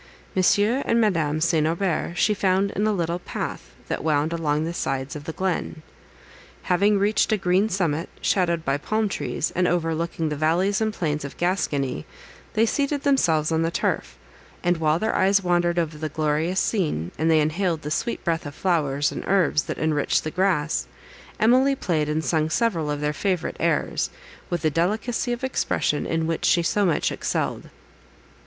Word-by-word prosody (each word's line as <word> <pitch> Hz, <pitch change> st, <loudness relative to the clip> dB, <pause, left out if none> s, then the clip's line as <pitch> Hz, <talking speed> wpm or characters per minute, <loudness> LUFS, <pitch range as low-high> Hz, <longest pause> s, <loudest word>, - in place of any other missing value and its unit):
Monsieur 205 Hz, +7 st, +3 dB
and 230 Hz, -, +3 dB
Madame 165 Hz, -9 st, +1 dB
St. 160 Hz, -1 st, +2 dB
Aubert 170 Hz, 0 st, -1 dB
she 205 Hz, +5 st, +3 dB
found 195 Hz, 0 st, +1 dB
in 210 Hz, +2 st, 0 dB
a -, -, +2 dB
little 170 Hz, -3 st, -1 dB
path -, -, -6 dB
that -, -, -3 dB
wound 155 Hz, +1 st, +1 dB
along 155 Hz, -2 st, 0 dB
the 170 Hz, -, -3 dB
sides 135 Hz, -3 st, -3 dB
of 145 Hz, -1 st, -8 dB
the 160 Hz, -, -3 dB
glen. 175 Hz, -3 st, -3 dB, 0.8 s
Having 200 Hz, +3 st, +3 dB
reached 205 Hz, +3 st, +2 dB
a 215 Hz, -, +3 dB
green 190 Hz, +2 st, +2 dB
summit, 170 Hz, -5 st, -1 dB
shadowed 170 Hz, -4 st, +1 dB
by 135 Hz, +1 st, +1 dB
palm 215 Hz, +7 st, 0 dB
trees, 145 Hz, -5 st, -2 dB
and 180 Hz, 0 st, +2 dB
overlooking 165 Hz, -1 st, -1 dB
the 150 Hz, -, -2 dB
valleys 175 Hz, +7 st, +1 dB
and 220 Hz, 0 st, +1 dB
plains 150 Hz, -7 st, -2 dB
of 140 Hz, -, -8 dB
Gascony, 145 Hz, -, -1 dB, 0.5 s
they 225 Hz, -, +3 dB
seated 280 Hz, +3 st, -1 dB
themselves 165 Hz, -, +2 dB
on 160 Hz, 0 st, +1 dB
the 165 Hz, -, +1 dB
turf; -, -, -2 dB, 0.5 s
and 175 Hz, 0 st, +2 dB
while 155 Hz, -1 st, +2 dB
their 220 Hz, +5 st, -1 dB
eyes 195 Hz, +1 st, +3 dB
wandered 175 Hz, -1 st, +1 dB
over 160 Hz, -3 st, -1 dB
the 155 Hz, 0 st, -3 dB
glorious 155 Hz, +4 st, 0 dB
scene, 150 Hz, -, -1 dB
and 160 Hz, +1 st, +2 dB
they 160 Hz, -1 st, +5 dB
inhaled 160 Hz, +1 st, 0 dB
the 150 Hz, -, -4 dB
sweet 230 Hz, +8 st, -2 dB
breath 165 Hz, -3 st, -1 dB
of 145 Hz, -, -9 dB
flowers 145 Hz, -6 st, +1 dB
and -, -, -5 dB
herbs 185 Hz, -6 st, +3 dB
that -, -, -4 dB
enriched 155 Hz, -2 st, +1 dB
the 155 Hz, -, -3 dB
grass, 170 Hz, -4 st, 0 dB, 0.5 s
Emily 260 Hz, +5 st, +4 dB
played 155 Hz, -, -1 dB
and 155 Hz, +1 st, -1 dB
sung 155 Hz, -2 st, +1 dB
several 170 Hz, -7 st, 0 dB
of 145 Hz, 0 st, -2 dB
their 150 Hz, 0 st, 0 dB
favourite 185 Hz, +1 st, -2 dB
airs, -, -, 0 dB, 0.4 s
with 175 Hz, -2 st, -2 dB
the 155 Hz, -, +2 dB
delicacy 215 Hz, -, 0 dB
of 240 Hz, +1 st, -3 dB
expression 250 Hz, -, 0 dB
in 165 Hz, 0 st, 0 dB
which 165 Hz, 0 st, -1 dB
she 170 Hz, -, +4 dB
so 200 Hz, +3 st, +2 dB
much 160 Hz, -, +1 dB
excelled. -, -, -2 dB
170 Hz, 180 wpm, -24 LUFS, 155-195 Hz, 0.8 s, they